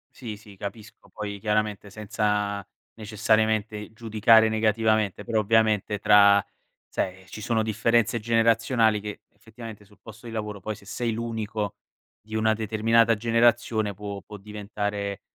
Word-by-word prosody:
Sì, 110 -6 -7
sì, 105 -2 -15
capisco. 105 +2 -9
Poi 100 -1 -6
chiaramente 105 -1 -1
senza 105 -1 -1 0.3
necessariamente 110 0 0
giudicare 110 0 +4
negativamente, 110 -2 +1
però 115 -2 +1
ovviamente 110 -1 +2
tra 100 0 +6 0.5
sai 95 0 -4
ci 105 - -9
sono 110 +1 0
differenze 115 +1 +1
generazionali 115 0 +2
che 105 0 -7
effettivamente, 110 -1 -11
sul 105 +1 -22
posto 115 +1 -12
di 115 - -7
lavoro 105 -2 -4
poi, 110 +4 -5
se 100 -1 -17
sei 115 +2 -2
l'unico 110 -3 -4 0.4
di 110 +1 -8
una 110 0 +2
determinata 115 +1 +2
generazione 115 -2 +2
può 100 -1 -6
può 105 +2 -11
diventare 105 -1 -4
110 Hz, 135 wpm, -25 LUFS, 105-115 Hz, 0.5 s, tra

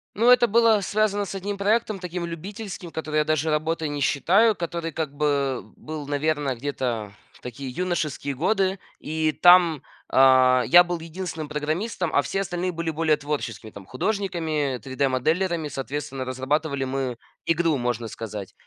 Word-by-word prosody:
Ну 230 +4 +3
это 250 -1 +7
было 225 0 +4
связано 205 +1 0
с 195 - -7
1 200 +1 -4
проектом, 215 +1 +1
таким 180 -1 -5
любительским, 185 +1 -7
который 155 -1 -3
я 150 - +2
даже 155 0 0
работой 155 +1 -1
не 145 0 -4
считаю, 200 +11 +3
который, 170 -1 -4
как 155 -2 -3
бы, 140 -4 0
был, 155 -2 -7
наверно, 145 -2 0
где-то 120 -5 -3 0.2
в - - -21
такие 125 +2 -7
юношеские 155 -4 -2
годы, 190 +4 +1 0.2
и 155 0 -1
там, 175 -3 +6 0.3
а, 130 -1 +5
я 175 +1 +8
был 175 -1 -3
единственным 165 -2 -6
программистом, 160 +4 -2
а 145 - +4
все 195 - -2
остальные 180 -1 -2
были 165 -1 -3
более 155 -1 +1
творческими, 145 -6 -4
там 100 -2 -11
художниками 160 -5 -1
3D-моделерами. 150 +6 0
Соответственно, 135 -1 -5
разрабатывали 135 +2 -1
мы 130 -2 -2 0.3
игру, 165 -1 +2
можно 120 -2 -2
сказать. 105 -3 -7
155 Hz, 150 wpm, -24 LUFS, 135-180 Hz, 0.3 s, я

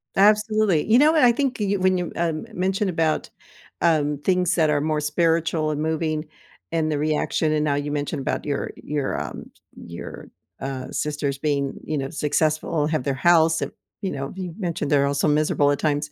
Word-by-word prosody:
Absolutely, 210 -3 +3
you 225 - +6
know 300 +4 +6
what, 315 -3 +3
I 245 - +7
think 260 0 -1
you 200 -1 0
when 185 0 +3
you, 175 -2 -3
um, 165 +1 -1
mentioned 190 +2 0
about, 165 -3 0 0.5
um, 150 -3 +2
things 180 -1 +2
that 160 -3 +3
are 145 -1 +2
more 155 0 0
spiritual 165 0 +1
and 150 0 -2
moving 155 0 -1 0.5
and 160 -1 0
the 150 - 0
reaction, 155 +1 0
and 155 -1 +1
now 145 -2 +1
you 145 +1 -2
mentioned 145 0 -2
about 135 - -2
your 145 -1 -2
your, 145 -2 -2
um, - - -7 0.3
your, 85 0 -9 0.3
uh, 135 -1 -5
sisters 145 -2 -2
being, 140 -1 -1
you 155 - -2
know, 135 -1 -3
successful 155 +1 0
and 150 - -1
have 155 -5 0
their 140 - 0
house 160 +3 +4
and - - -3 0.3
you 195 - -2
know, 135 -1 -4
you 185 -3 -5
mentioned 170 -6 -2
they're 140 -1 +4
also 140 +2 +1
miserable 150 -1 +2
at 145 - -1
times. 150 -1 -1
155 Hz, 195 wpm, -23 LUFS, 145-175 Hz, 0.5 s, I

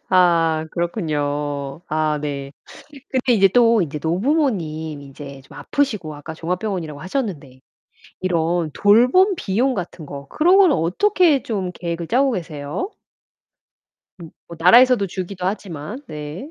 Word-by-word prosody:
아 165 -3 +3
그렇군요. 145 -5 -2
아 155 -1 0
네. 140 -2 -4 0.6
근데 255 -1 +1
이제 195 -3 +5
또 230 +1 +4
이제 150 -2 -3
노부모님 170 - -1
이제 140 0 -10
좀 140 +1 -15
아프시고 210 - -2
아까 145 +2 -8
종합병원이라고 170 -3 -4
하셨는데 175 - -4 0.6
이런 170 -2 0
돌봄 250 - +4
비용 245 - 0
같은 175 -5 -6
거 140 -1 -9
그런 350 - +3
거는 375 -6 +5
어떻게 310 - +2
좀 195 -5 -3
계획을 170 -1 -5
짜고 265 +5 +2
계세요? 165 - -4 1.3
음 165 - -10 0.2
뭐 170 - -9
나라에서도 235 +4 +6
주기도 185 0 -6
하지만 190 - -5
네. 150 - -7
175 Hz, 280 characters per minute, -21 LUFS, 155-230 Hz, 1.3 s, 나라에서도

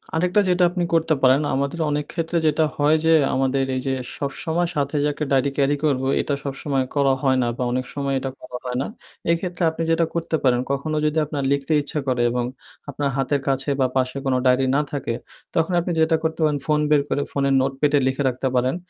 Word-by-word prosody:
আরেকটা 180 +5 +2
যেটা 180 0 +3
আপনি 180 -1 -2
করতে 165 -1 +3
পারেন, 130 +2 +5
আমাদের 140 +4 -1
অনেক 150 0 -1
ক্ষেত্রে 170 0 -1
যেটা 155 +1 +3
হয় 150 +2 +4
যে 165 - +5 0.2
আমাদের 135 +1 +1
এই 130 - -1
যে 135 - +1 0.2
সবসময় 160 +5 -1
সাথে 140 0 -1
যে 150 - +2
একটা 150 - -3
ডায়রি 135 +1 +3
carry 140 +1 +2
করব। 135 -3 +1 0.2
এটা 145 - -2
সবসময় 135 -1 -1
করা 140 -1 +3
হয় 130 -1 +3
না 120 - 0
বা - - -1
অনেক 130 0 -1
সময় 140 -1 -2
এটা 135 - -3
করা 125 - -7
হয় 125 0 -2
না। - - -2 0.4
এক্ষেত্রে 175 +1 -2
আপনি 165 +1 -4
যেটা 165 0 +3
করতে 165 -1 -1
পারেন, 125 -2 +3
কখনো 155 +3 -2
যদি 150 +1 0
আপনার 145 -2 -3
লিখতে 140 +2 -1
ইচ্ছা 150 +1 -3
করে 125 -2 +1
এবং 125 0 -1 0.5
আপনার 140 0 -1
হাতের 135 +1 0
কাছে 135 +1 0
বা 130 - +4
পাশে 130 +1 0
কোন 135 - +1
ডায়রি 130 +1 +4
না 145 - +3
থাকে 135 -5 -2 0.4
তখন 165 +2 +1
আপনি 175 +1 -2
যেটা 160 +1 +3
করতে 160 +1 -2
পারেন 150 -2 +2
ফোন 150 -1 +2
বের 150 -1 +4
করে 145 - 0
ফোনের 140 -1 +1
notepad 135 +2 0
এ - - +4
লিখে 135 +2 0
রাখতে 130 +1 -2
পারেন। 125 +3 +1
140 Hz, 215 wpm, -22 LUFS, 135-160 Hz, 0.5 s, পারেন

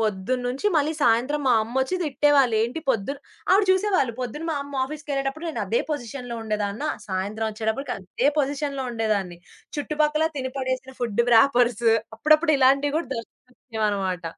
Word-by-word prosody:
పొద్దున్న 215 +4 -1
నుంచి 265 +10 -2
మళ్ళీ 305 0 +2
సాయంత్రం 255 +4 +2
మా 255 - +5
అమ్మొచ్చి 260 +8 -1
తిట్టేవాళ్ళు, 285 -5 +3
"ఏంటి 245 +8 -2
పొద్దు" 225 +2 -1 0.4
ఆవిడ 395 +2 +5
చూసేవాళ్ళు 375 - +2
పొద్దున 255 +6 -4
మా - - 0
అమ్మ 285 0 -10
ఆఫీస్‌కెళ్ళేటప్పుడు 290 +1 -4
నేను 320 - -3
అదే 475 - +1
పొజిషన్‌లో 245 -3 -5
ఉండేదాన్న, 210 +3 -2 0.2
సాయంత్రం 205 +3 -2
ఒచ్చేటప్పటికి 220 +5 -2
అదే 190 +7 -2
పొజిషన్‌లో 280 -1 -1
ఉండేదాన్ని. 210 -6 -1 0.4
చుట్టుపక్కల 300 +1 +1
తిని 260 -1 -3
పడేసిన 260 0 -3
ఫుడ్డు 235 -1 +1
వ్రాపర్సు, 240 -1 +4 0.3
అప్పుడప్పుడు 310 +6 +4
ఇలాంటివి 275 +2 +3
గూడా 325 -4 -2
దర్శనమిచ్చేవన్నమాట. 215 -6 -4
260 Hz, 140 wpm, -24 LUFS, 225-290 Hz, 0.4 s, మా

